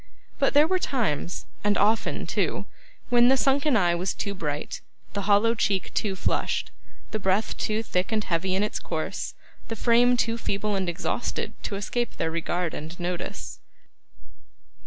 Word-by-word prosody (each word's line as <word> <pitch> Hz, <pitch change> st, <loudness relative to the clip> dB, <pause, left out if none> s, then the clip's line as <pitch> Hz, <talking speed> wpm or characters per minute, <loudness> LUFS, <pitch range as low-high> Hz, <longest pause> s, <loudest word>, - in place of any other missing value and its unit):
But 275 Hz, 0 st, +2 dB
there 295 Hz, +1 st, +8 dB
were 370 Hz, +3 st, +1 dB
times, 200 Hz, -, -1 dB, 0.2 s
and 205 Hz, 0 st, +3 dB
often 220 Hz, +2 st, +2 dB
too, -, -, -1 dB, 0.4 s
when 240 Hz, 0 st, +6 dB
the 265 Hz, +1 st, +5 dB
sunken 275 Hz, 0 st, +3 dB
eye 175 Hz, -4 st, +3 dB
was 180 Hz, +2 st, -1 dB
too 200 Hz, -, -3 dB
bright, 150 Hz, -5 st, -3 dB, 0.3 s
the 200 Hz, -1 st, -3 dB
hollow 210 Hz, +3 st, +5 dB
cheek 195 Hz, -4 st, 0 dB
too 200 Hz, -3 st, 0 dB
flushed, -, -, -1 dB, 0.4 s
the 215 Hz, -, -1 dB
breath 195 Hz, +2 st, +1 dB
too 215 Hz, +1 st, -1 dB
thick 185 Hz, -1 st, -1 dB
and 215 Hz, -1 st, +1 dB
heavy 185 Hz, +1 st, 0 dB
in 195 Hz, -, +2 dB
its 210 Hz, -, -2 dB
course, -, -, -3 dB, 0.3 s
the 225 Hz, -, -3 dB
frame 240 Hz, +2 st, +4 dB
too 230 Hz, 0 st, +1 dB
feeble 210 Hz, 0 st, -1 dB
and 190 Hz, -2 st, 0 dB
exhausted, 170 Hz, -, -2 dB
to 200 Hz, -, -3 dB
escape 235 Hz, +4 st, -2 dB
their 160 Hz, -, 0 dB
regard 170 Hz, +1 st, -1 dB
and 160 Hz, +4 st, -7 dB
notice. 175 Hz, 0 st, -4 dB
205 Hz, 160 wpm, -26 LUFS, 180-235 Hz, 0.4 s, there